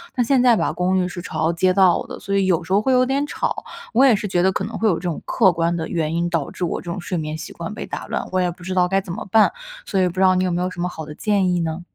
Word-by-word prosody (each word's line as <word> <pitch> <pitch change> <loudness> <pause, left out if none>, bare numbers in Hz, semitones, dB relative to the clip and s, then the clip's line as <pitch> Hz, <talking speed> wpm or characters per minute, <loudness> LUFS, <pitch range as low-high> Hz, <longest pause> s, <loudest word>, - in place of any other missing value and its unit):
但 245 - +1
现 265 +1 +3
在 245 -2 +5
吧， - - 0
公 185 +1 +1
寓 185 - +1
是 180 0 -7
朝 160 +1 0
街 185 +2 +2
道 185 -2 +4
的， - - -8
所 200 - -3
以 195 -1 +2
有 180 -4 +1
时 165 - -10
候 200 - +5
会 265 - +1
有 255 0 +5
点 275 +2 0
吵， - - -3 0.3
我 255 +4 +5
也 250 -5 +6
是 205 +1 -3
觉 180 -2 +1
得 190 - +4
可 190 - -2
能 215 +2 -5
会 225 - +1
有 190 - +3
这 - - -6
种 175 -4 -3
客 195 -6 +3
观 170 0 0
的 160 -1 -3
原 160 -2 -2
因， 170 +1 0
导 165 -5 -1
致 - - -6
我 175 - -1
这 175 - -8
种 190 - -4
睡 180 +1 -3
眠 155 -1 -3
习 160 - -8
惯 170 +4 -6
被 - - -6
打 - - -6
乱。 - - -3
我 185 - +1
也 180 - +1
不 175 - -15
知 185 +1 -4
道 180 -1 +3
该 195 +2 +1
怎 190 -3 -8
么 - - -6
办， 220 -1 +5 0.4
所 195 - 0
以 185 - +3
不 175 - -4
知 185 - -1
道 185 -1 +5
你 185 - +1
有 185 - 0
没 175 +1 -1
有 180 - 0
什 185 - -10
么 180 - 0
好 160 -3 -7
的 150 - -8
建 200 -2 +1
议 175 - +1
呢？ 160 +1 -3
185 Hz, 365 characters per minute, -21 LUFS, 170-200 Hz, 0.4 s, 也